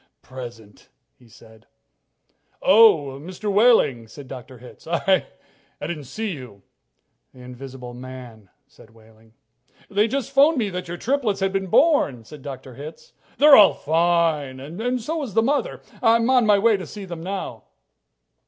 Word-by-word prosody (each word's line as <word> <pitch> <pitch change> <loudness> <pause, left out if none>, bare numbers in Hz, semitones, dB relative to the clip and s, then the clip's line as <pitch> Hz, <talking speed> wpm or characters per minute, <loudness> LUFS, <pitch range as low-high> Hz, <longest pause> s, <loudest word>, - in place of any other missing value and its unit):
"Present," 120 -5 -11 0.2
he 120 -2 -23
said. 110 0 -19 0.9
"Oh, 175 -10 +4
Mr. 185 +5 -5
Wehling," 200 - +3
said 135 +5 -12
Dr. 130 0 -10
Hitz, 125 +5 -15
"I 185 +3 +1 0.5
didn't 150 -1 -6
see 215 - -4
you." 125 - -10 0.7
"The 125 - -14
invisible 125 0 -10
man," 125 -5 -11 0.2
said 110 +1 -20
Wehling. 110 0 -22 0.6
"They 205 +2 +2
just 270 +2 -3
phoned 285 +3 +4
me 215 -5 -1
that 180 0 -5
your 175 +1 -6
triplets 245 -2 -1
have 195 0 0
been 195 -1 -2
born," 175 - +2
said 145 +5 -13
Dr. 130 -1 -9
Hitz. 155 - -11 0.2
"They're 295 -1 +8
all 210 - +7
fine, 160 -4 0
and 220 - -3
so 315 +7 -4
is 245 -9 -7
the 225 - +4
mother. 290 - -1 0.2
I'm 230 +1 +3
on 250 -4 +3
my 205 -1 +5
way 225 +3 +3
in 200 - 0
to 185 - -8
see 205 -2 -9
them 170 -3 -8
now." 180 - -6
170 Hz, 155 wpm, -22 LUFS, -, 0.9 s, They're